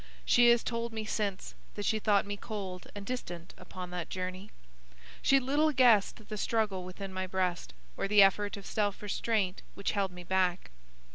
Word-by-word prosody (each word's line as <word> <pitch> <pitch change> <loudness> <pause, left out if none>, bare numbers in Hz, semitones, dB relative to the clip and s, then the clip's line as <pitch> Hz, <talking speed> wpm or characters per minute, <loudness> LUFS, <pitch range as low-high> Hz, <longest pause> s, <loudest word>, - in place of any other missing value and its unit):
She 240 0 +6
has 235 -1 +5
told 230 -1 -3
me 220 -1 -3
since 205 -3 -2 0.2
that 205 - -4
she 220 - +1
thought 205 -2 +3
me 205 0 -3
cold 195 -4 -6
and 200 -1 -7
distant 175 -8 -5
upon 180 -1 -8
that 175 -2 -4
journey. 185 +2 -5 0.7
She 275 - +5
little 290 +4 +2
guessed 235 -5 +4
the 215 - -5
struggle 210 -4 0
within 190 +1 -7
my 185 0 -3
breast, 185 - -2 0.2
or - - -2
the 205 0 +7
effort 205 +1 +2
of 200 - -10
self 205 -1 -1
restraint 205 -2 -1
which 200 - -1
held 200 -2 0
me 180 0 -10
back. 185 - 0
200 Hz, 180 wpm, -31 LUFS, 185-220 Hz, 0.7 s, the